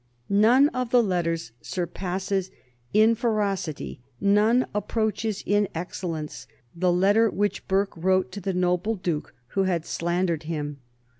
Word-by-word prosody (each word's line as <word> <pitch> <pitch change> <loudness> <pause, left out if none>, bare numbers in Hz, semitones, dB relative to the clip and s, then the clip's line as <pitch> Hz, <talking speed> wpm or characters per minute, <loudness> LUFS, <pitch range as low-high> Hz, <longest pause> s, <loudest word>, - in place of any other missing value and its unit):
None 235 +8 +5
of 255 -3 -3
the 245 0 +5
letters 165 - -1
surpasses 185 +2 -2 0.4
in 220 +2 +5
ferocity, 200 - -2 0.2
none 210 +5 +4
approaches 215 0 -1
in 205 0 +2
excellence 165 -2 -5 0.3
the 180 +1 +2
letter 200 +5 +4
which 205 +1 -2
Burke 195 +1 +1
wrote 185 +2 +1
to 200 +2 -6
the 190 0 -2
noble 180 +4 +1
Duke 175 -6 -3
who 195 +5 +1
had 170 -3 0
slandered 170 -1 -1
him. 150 -3 -4
190 Hz, 130 wpm, -25 LUFS, 175-210 Hz, 0.4 s, None